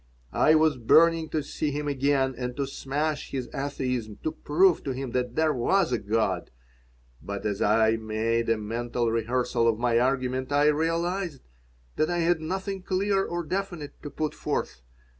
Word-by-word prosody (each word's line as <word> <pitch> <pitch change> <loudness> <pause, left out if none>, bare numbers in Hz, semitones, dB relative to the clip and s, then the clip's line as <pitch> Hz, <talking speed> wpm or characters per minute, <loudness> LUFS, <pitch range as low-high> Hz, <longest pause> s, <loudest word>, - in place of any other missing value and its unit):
I 155 - +5
was 155 -3 +3
burning 160 +6 +4
to 155 -2 -1
see 150 +1 -2
him 145 +1 -3
again 135 -1 +1
and 125 0 -5
to 140 - 0
smash 145 +3 -3
his 130 -3 -4
atheism, 125 -6 -3
to 155 - 0
prove 165 +3 +2
to 135 - -1
him 130 -1 -4
that 125 -1 -2
there 160 -1 +2
was 170 +8 +2
a - - +1
God. 100 -4 -1 0.7
But 100 0 -6
as 105 -2 -1
I 110 +1 +3
made 115 +1 -1
a 115 - +3
mental 115 +2 -2
rehearsal 120 +1 0
of 115 -2 +2
my 120 0 +2
argument 130 +1 0
I 145 +1 +4
realized 165 +1 -1 0.5
that 155 - +2
I 175 - 0
had 170 -1 +2
nothing 190 +4 -3
clear 195 +1 +1
or 175 -1 -3
definite 175 -4 -4
to 145 - -6
put 155 +1 -3
forth. 60 +1 -3
135 Hz, 170 wpm, -27 LUFS, 120-160 Hz, 0.7 s, I